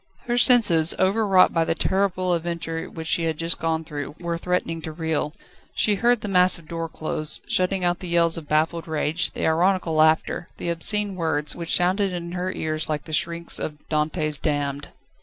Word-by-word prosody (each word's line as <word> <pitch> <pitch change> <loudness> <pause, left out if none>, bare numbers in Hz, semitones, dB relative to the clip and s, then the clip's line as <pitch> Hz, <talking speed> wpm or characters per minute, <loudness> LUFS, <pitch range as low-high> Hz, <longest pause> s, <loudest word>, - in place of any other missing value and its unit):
Her 240 - -1
senses, 185 - +5
overwrought 195 -1 +3
by 165 - +2
the 165 - -1
terrible 185 -1 0
adventure 165 -1 -4
which 160 -1 -8
she 165 +1 +1
had 160 -2 -2
just 165 +1 -1
gone 160 0 -1
through, 150 -1 -7
were 170 -1 -3
threatening 170 -1 -2
to 160 - -6
reel; 160 -2 -2 0.4
she 210 - +3
heard 235 +3 +2
the - - -4
massive 180 -4 +3
door 165 0 -5
close, 155 -1 -1
shutting 185 +1 0
out 175 0 0
the 185 - -7
yells 170 -1 +3
of 160 -3 -3
baffled 160 +2 0
rage, 160 +2 0
the - - -3
ironical 175 +1 +1
laughter, 155 +2 +2
the 175 - -4
obscene 205 +4 +2
words, 160 -4 -1
which 170 -1 0
sounded 185 +2 +1
in 170 -1 -5
her 180 +1 -3
ears 155 -3 -3
like 150 -1 -2
the 155 - -9
shrieks 170 +2 -2
of 150 -1 -7
Dante's 155 -1 -1
damned. 145 -2 -2
170 Hz, 185 wpm, -23 LUFS, 160-180 Hz, 0.4 s, senses